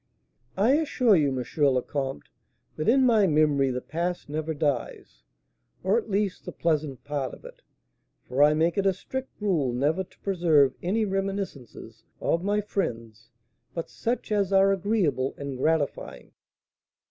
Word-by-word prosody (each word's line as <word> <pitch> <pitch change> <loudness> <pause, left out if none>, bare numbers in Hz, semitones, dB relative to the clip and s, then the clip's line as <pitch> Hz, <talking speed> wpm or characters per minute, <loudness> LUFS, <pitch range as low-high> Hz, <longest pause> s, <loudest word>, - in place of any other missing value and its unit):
"I 210 +6 +4
assure 255 -8 +3
you, 150 -4 +3
M. 130 -2 -2 0.2
le 130 -3 +4
Comte, 135 -2 -4 0.5
that 155 - 0
in 260 +2 +5
my 220 -5 +4
memory 150 -4 +3
the 125 0 -3
past 170 +3 -3
never 155 +2 -3
dies; 140 - -3 0.6
or, 190 +3 +2
at 230 -1 -1
least, 200 -1 -1
the - - -5
pleasant 155 -5 -1
part 145 -2 -3
of - - -19
it; - - -12 0.7
for 130 +3 0
I 150 +1 +6
make 165 +4 +1
it 195 - +2
a 190 - +3
strict 265 +8 -7
rule 170 - +1
never 145 +9 0
to 185 - -23
preserve 165 -8 +3
any 215 +5 0
reminiscences 195 - -5 0.2
of 170 +1 0
my 205 +1 +1
friends 115 - -4 0.5
but 165 - -5
such 235 -1 -3
as 200 -2 +1
are 195 0 +5
agreeable 185 -9 0
and 140 -1 -5
gratifying." 150 +2 -2
165 Hz, 155 wpm, -26 LUFS, 140-195 Hz, 0.7 s, I